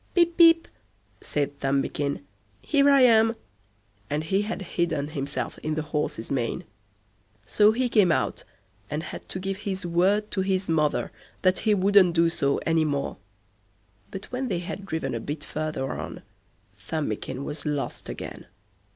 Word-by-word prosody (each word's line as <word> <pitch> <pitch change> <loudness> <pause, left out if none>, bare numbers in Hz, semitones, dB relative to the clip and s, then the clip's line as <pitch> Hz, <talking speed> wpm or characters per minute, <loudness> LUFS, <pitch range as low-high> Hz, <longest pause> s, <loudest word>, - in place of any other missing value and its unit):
"Pip, 340 -1 +4
Pip", 330 -1 +6 0.5
said 145 -1 -2
Thumbikin, 140 -1 -1 0.4
"here 285 -2 +3
I 275 -1 +6
am"; 225 -2 +5 0.7
and 150 +2 -1
he 190 +5 +1
had 210 -1 -4
hidden 170 -5 -1
himself 140 -1 -4
in 155 0 -2
the 155 - -1
horse's 150 -6 -3
mane. 125 -4 -1 0.8
So 210 - +5
he 250 +3 0
came 210 -7 +4
out, - - 0 0.5
and 150 +2 -3
had - - -8
to - - -4
give 195 +1 -3
his 195 -3 -4
word 190 +5 +2
to 195 - 0
his 190 0 0
mother 155 -2 +1 0.3
that 185 0 +3
he 210 - +5
wouldn't 190 -2 +5
do 165 0 +4
so 140 -4 +1
any 165 -1 +3
more. 140 -2 -2 0.9
But 195 - -7
when 255 +1 -2
they 190 -7 -1
had 195 +3 -6
driven 160 -7 -2
a 115 - -2
bit 145 +5 -5
further 155 -4 -3
on, - - -6 0.6
Thumbikin 140 0 -3
was 150 +1 -6
lost 145 -2 -3
again. - - -7
170 Hz, 155 wpm, -26 LUFS, 150-205 Hz, 0.9 s, Pip